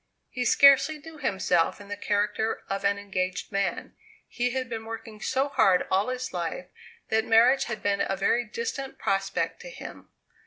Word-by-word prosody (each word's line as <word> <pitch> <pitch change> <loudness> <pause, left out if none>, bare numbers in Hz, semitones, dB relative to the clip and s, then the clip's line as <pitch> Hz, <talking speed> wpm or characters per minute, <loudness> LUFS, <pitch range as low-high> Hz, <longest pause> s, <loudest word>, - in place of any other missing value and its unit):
He 250 -1 -2
scarcely 280 +4 +6
knew 310 +1 -12
himself 190 - +1
in 205 - -12
the 205 - -4
character 210 +2 -1
of 195 0 -3
an 200 0 +2
engaged 185 -2 -3
man. 195 0 -2 0.3
He 245 +1 -1
had 260 0 -3
been 225 -1 -5
working 225 -1 -8
so 270 +2 0
hard 190 -9 +3
all 195 +3 +2
his 255 0 -4
life 175 0 -3 0.4
that 220 0 +2
marriage 235 +5 +4
had 230 -3 -5
been 200 0 +1
a 195 - -1
very 230 +5 +2
distant 275 - -5
prospect 195 0 -1
to - - -9
him. - - -10
220 Hz, 170 wpm, -27 LUFS, 195-255 Hz, 0.4 s, scarcely